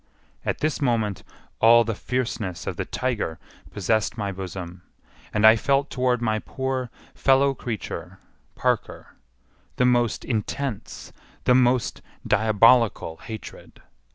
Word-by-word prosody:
At - - -2
this 155 -1 -1
moment 110 -7 0 0.4
all 115 +1 +7
the 115 0 -2
fierceness 110 -6 -3
of - - -3
the - - -3
tiger 120 -11 -2 0.3
possessed 110 +3 0
my 100 -2 -2
bosom, 90 -2 -7 0.5
and 105 +1 +2
I 110 +1 +9
felt 135 +4 +1
toward 125 -2 0
my 110 -2 +1
poor 130 0 -3 0.2
fellow 135 +1 +3
creature, 120 -4 -6 0.4
Parker, - - -2 0.6
the 125 - +2
most 120 -3 +2
intense, 115 +1 -4 0.3
the 125 - +4
most 125 -1 +2 0.2
diabolical 110 -4 +3
hatred. 110 -1 -10
115 Hz, 120 wpm, -24 LUFS, 105-130 Hz, 0.6 s, I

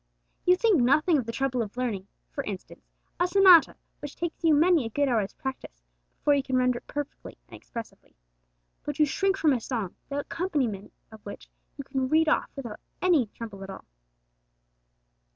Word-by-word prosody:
You 360 - +7
think 385 - +3
nothing 305 +6 +3
of 235 - -5
the - - -2
trouble 255 0 -1
of 215 +1 -6
learning, 215 -7 -2 0.2
for 280 - -4
instance, 195 -3 -8 0.3
a 355 - +3
sonata, 365 -3 +6 0.2
which 290 - -8
takes 340 0 -5
you 320 -2 +5
many 330 0 +4
a 225 - -4
good 285 +5 0
hour's 220 -5 0
practice 160 - -7 0.3
before 290 - +2
you 280 - +2
can 265 -1 -1
render 250 -1 +2
it - - -35
perfectly 290 -1 -6
and - - -12
expressively. 230 -1 -10 0.7
But 295 -1 -4
you 305 - +5
shrink 385 +7 0
from 315 -7 +3
a 245 - -1
song, 220 -7 -4
the 285 0 -2
accompaniment 275 - -3 0.2
of 220 -1 -14
which 205 - -10 0.3
you 280 - -5
cannot 265 -1 -2
read 320 +2 +3
off - - +1
without 240 -7 -7 0.2
any 335 -10 +3
trouble 205 -2 -9
at 195 - -9
all. 195 - -9
270 Hz, 185 wpm, -27 LUFS, 230-315 Hz, 0.7 s, You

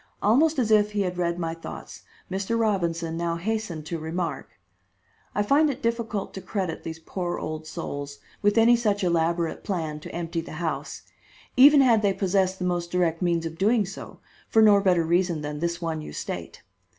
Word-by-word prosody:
Almost 290 +10 +3
as 230 -4 +1
if 210 -1 +4
he 205 - 0
had 180 -2 -2
read 170 -1 0
my 165 -2 -2
thoughts, 165 - -9 0.3
Mr. 195 +4 -1
Robinson 170 -6 0
now 170 0 -1
hastened 180 -4 -3
to 165 +1 -4
remark: 165 +2 -3 0.9
"I 205 - +2
find 290 +8 +4
it 275 0 -5
difficult 230 -3 -2
to 190 - -6
credit 185 -6 -3
these 160 0 -5
poor 175 +2 -4
old 155 0 -5
souls 145 -2 -6 0.2
with 205 +2 +2
any 230 +2 +6
such 210 -4 0
elaborate 170 -1 0
plan 160 -6 -3
to - - -9
empty 170 0 -3
the 165 - -10
house, - - -4 0.5
even 280 +3 +8
had 235 -5 +4
they 200 -2 +2
possessed 190 -1 +1
the 180 - -3
most 175 -1 -1
direct 170 -2 +1
means 170 -2 +1
of 165 0 -6
doing 215 +2 +3
so, 190 +2 -9 0.3
for 220 - +5
no 205 -2 +7
better 180 -4 +3
reason 170 -1 +1
than 150 0 -4
this 170 +1 -2
one 160 -2 -2
you 75 - -8
state. - - -6
180 Hz, 185 wpm, -25 LUFS, 165-210 Hz, 0.9 s, even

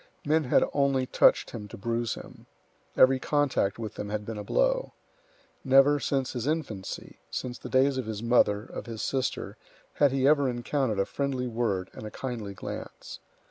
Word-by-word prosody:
Men 155 +1 +2
had 125 - +4
only 140 -2 +2
touched - - +3
him 105 -3 -7
to - - -10
bruise 115 +3 -1
him. - - -12 0.5
Every 130 0 +6
contact 140 -9 +1
with 110 -2 -5
them 105 - -6
had 105 0 -3
been 110 -1 -5
a - - -5
blow. - - +1 0.7
Never, 135 +2 +5
since 135 0 -1
his 125 0 -3
infancy, 135 -12 -4
since 125 -1 -4
the - - -8
days 130 0 +3
of 125 - -4
his 110 0 -4
mother, 110 -3 +3
of - - -8
his 115 -2 -5
sister, 135 -2 -2 0.4
had 145 -2 +3
he 135 0 +2
ever 145 -2 +4
encountered 120 -1 -1
a 100 - +2
friendly 135 -3 -2
word 110 -6 -1
and 110 - -8
a - - -5
kindly 110 -4 -5
glance. - - -8
125 Hz, 180 wpm, -28 LUFS, 110-140 Hz, 0.7 s, Every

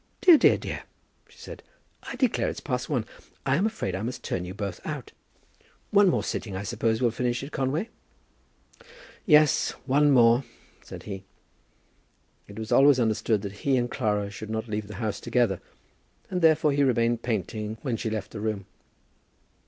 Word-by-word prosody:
"Dear, 365 -4 +8
dear, - - +5
dear," - - -6 0.5
she - - -21
said, - - -10 0.4
"I - - -7
declare 250 -2 +1
it's - - -6
past 125 -3 -3
one. 125 -7 0 0.4
I'm 140 +10 +2
afraid 220 - -3
I 95 - -3
must 125 +3 -5
turn 90 - -3
you 90 +1 -7
both 100 -2 -5
out. - - -6 0.8
One 205 -2 +6
more - - +1
sitting, 100 -4 -4
I 95 - -4
suppose, 115 +2 -1
will 120 - +3
finish 120 +2 -2
it, 140 - -8
Conway?" 145 - -1 1.4
"Yes, 150 -3 +4
one 145 +2 +3
more," 120 -1 +5 0.4
said - - -10
he. 95 -2 -7 1.2
It 100 - -12
was 110 0 -6
always 140 -1 +6
understood 110 -2 +1
that 100 0 -7
he 135 -2 +2
and 120 -1 -1
Clara 105 -3 -1
should 105 +2 -8
not 110 +1 -3
leave 105 -1 -3
the 105 - -9
house 105 -1 -3
together, 115 -7 0 0.7
and 180 -1 -1
therefore 155 -2 +4
he 140 +1 +1
remained 120 -3 +2
painting 110 -1 -3
when 130 -5 -1
she 110 - -3
left 110 -2 -4
the 105 - -7
room. 105 -3 -2
115 Hz, 170 wpm, -26 LUFS, 105-140 Hz, 1.4 s, Dear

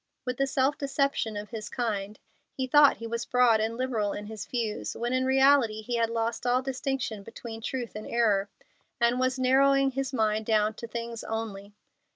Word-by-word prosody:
With 250 -1 -3
the 275 - +1
self 270 +1 +1
deception 275 -6 0
of 210 +2 -7
his 220 -2 -6
kind, 210 -4 -3 0.4
he 260 - -2
thought 290 +2 +6
he 230 - -7
was 230 0 -3
broad 245 -3 +4
and 225 +1 -1
liberal 230 -6 -1
in 205 - -6
his 215 -2 -7
views, 230 -4 -3
when 240 +2 -2
in 255 0 +1
reality 265 -5 +4
he 240 +2 -2
had 230 -1 +1
lost 230 +1 -2
all 250 +1 +2
distinction 265 -5 -3
between 225 +2 -9
truth 240 -1 -4
and 215 - -6
error, 210 -4 +2 0.5
and 235 +1 +2
was 255 0 +1
narrowing 270 +1 +4
his 270 0 -3
mind 220 -3 0
down 215 -1 +2
to 235 +2 -8
things 230 0 -5
only. 210 -2 -5
235 Hz, 190 wpm, -28 LUFS, 220-260 Hz, 0.5 s, thought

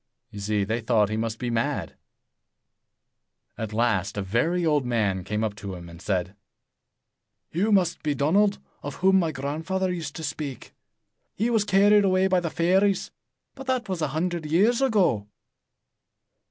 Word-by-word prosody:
You 105 - -8
see, 105 0 0
they 110 +4 -2
thought 110 -3 +2
he 110 - -2
must 110 0 -2
be 120 0 -3
mad. 115 0 -1 1.6
At 110 -2 -5
last, 105 -3 0
a 100 - -1
very 160 - 0
old 150 -3 +2
man 105 -6 0
came 105 +4 -2
up 110 -2 -1
to 100 -2 -6
him 85 -1 -10
and 85 0 -12
said, 95 -1 -2 1.2
"You 200 +7 +1
must 185 -4 +2
be 150 -1 0
that - - -8
Donald 200 +9 +3 0.2
of 145 -1 -6
whom 190 0 +4
my 165 -3 0
grandfather 160 +7 -2
used 160 -5 -5
to 160 - -6
speak. 145 -2 -5 0.6
He 230 +4 0
was 220 -3 +3
carried 205 +1 +5
away 185 -1 +3
by 185 -1 +3
the 170 -2 -3
fairies; 185 +4 +2 0.4
but 270 - -10
that 255 -3 0
was 185 -4 -3
a 155 - +1
hundred 160 +2 -2
years 210 - +3
ago." 185 - +2
155 Hz, 165 wpm, -25 LUFS, -, 1.6 s, carried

